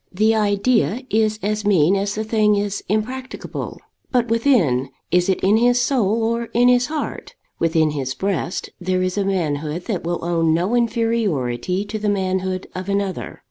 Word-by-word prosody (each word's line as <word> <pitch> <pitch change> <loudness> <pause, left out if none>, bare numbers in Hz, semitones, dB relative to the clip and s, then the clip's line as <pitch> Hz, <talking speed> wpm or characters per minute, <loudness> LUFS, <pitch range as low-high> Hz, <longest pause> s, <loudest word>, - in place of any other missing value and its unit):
The 215 +4 +2
idea 215 +3 +1
is 215 0 +2
as 210 +1 -1
mean 190 -3 +4
as 200 +1 -1
the 215 - -2
thing 215 -1 +2
is 200 0 -2
impracticable. 250 +5 -4 0.3
But 245 -2 +1
within, 210 - +2 0.2
is 180 +1 +3
it 190 - +2
in 205 +3 +4
his 245 +1 +3
soul 230 -4 +1
or 230 +1 0
in 245 +1 +5
his 245 0 +3
heart? 310 -1 -5 0.2
within 160 -2 +2
his 135 -3 -3
breast 190 -2 -2
there 185 0 0
is 185 0 -1
a 205 - +1
manhood 160 -3 -2
that 200 -6 -2
will 170 0 -3
own 165 -2 +2
no 180 +7 0
inferiority 205 - 0
to 215 +1 -5
the 210 0 0
manhood 190 -1 -1
of 185 +1 -5
another. 200 -1 -2
200 Hz, 170 wpm, -21 LUFS, 180-225 Hz, 0.3 s, in